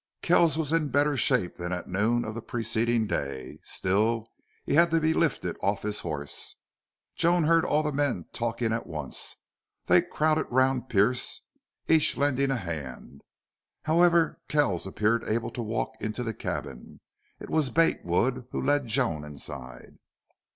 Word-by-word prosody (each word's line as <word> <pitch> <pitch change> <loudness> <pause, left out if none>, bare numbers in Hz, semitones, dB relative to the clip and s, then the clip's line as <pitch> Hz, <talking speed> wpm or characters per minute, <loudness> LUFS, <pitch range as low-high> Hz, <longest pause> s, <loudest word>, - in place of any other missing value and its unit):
Kells 170 -3 +4
was 160 -1 -1
in 165 -2 +2
better 145 +2 +2
shape 125 -6 +1
than 90 0 -4
at 90 -1 -4
noon 110 +6 +1
of 110 - -4
the 115 - -6
preceding 115 0 0
day. 70 -9 -4
Still, 110 +4 0 0.4
he - - -1
had 170 +3 +5
to 165 0 +2
be 160 0 +2
lifted 165 -1 0
off 100 0 0
his 105 0 -2
horse. 75 -2 -4 0.6
Joan 170 0 +3
heard 165 +1 +4
all 155 -3 +1
the 150 - -1
men 135 - -1
talking 115 -1 -1
at 115 - -3
once. 75 -4 -4 0.5
They - - +5
crowded 155 +1 0
round 130 0 +1
Pearce, 115 +5 +1 0.5
each 160 -2 +3
lending 140 -1 +1
a 135 - +1
hand. 70 - -7 0.6
However, 170 +1 +3
Kells 120 - +1
appeared 110 +4 +1
able 115 +2 -1
to 120 - -5
walk 110 0 -2
into 110 +3 -3
the 115 -2 -3
cabin. 60 - -6 0.4
It - - -9
was 155 -4 +2
Bate 165 +3 +2
Wood 125 +8 0
who - - -3
led 145 -1 +1
Joan 110 - 0
inside. 65 -4 -8
120 Hz, 160 wpm, -27 LUFS, 100-145 Hz, 0.6 s, had